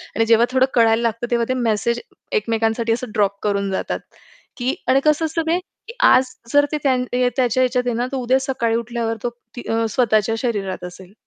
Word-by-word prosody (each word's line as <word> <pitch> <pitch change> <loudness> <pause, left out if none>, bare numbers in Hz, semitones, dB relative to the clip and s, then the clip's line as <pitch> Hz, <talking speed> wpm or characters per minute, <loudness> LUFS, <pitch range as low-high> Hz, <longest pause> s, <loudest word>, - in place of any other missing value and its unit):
आणि 225 - +2
जेव्हा 230 +1 +5
थोडं 260 0 +4
कळायला 225 -1 +4
लागतं 235 +1 -2
तेव्हा 235 -1 +2
ते - - +2
मेसेज 230 0 0 0.3
एकमेकांसाठी 225 - 0
असं 240 0 -4
ड्रॉप 200 -1 +1
करून 200 -1 0
जातात, 190 - -2 0.6
की 255 +3 -1
आणि 260 +2 +4
कसं 305 +1 +3
असतं 320 +1 -1
ते 340 +2 +2 0.3
की 460 - -8
आज 255 0 +4 0.2
जर 290 0 +5
ते 305 - 0
त्यां 260 -3 +2
अ, 250 0 0
त्याच्या 255 0 +2
ह्याच्यात 250 0 0
आहे 240 - 0
ना 245 +2 -1
तर 270 - -2
उद्या 255 +1 +2
सकाळी 260 -4 -1
उठल्यावर 235 -1 -2
तो 240 - 0 0.3
ती 245 - -7
अ, 225 0 +1
स्वतःच्या 220 -1 +2
शरीरात 200 -7 -3
असेल. 180 +2 -11
235 Hz, 200 wpm, -20 LUFS, 225-255 Hz, 0.6 s, जेव्हा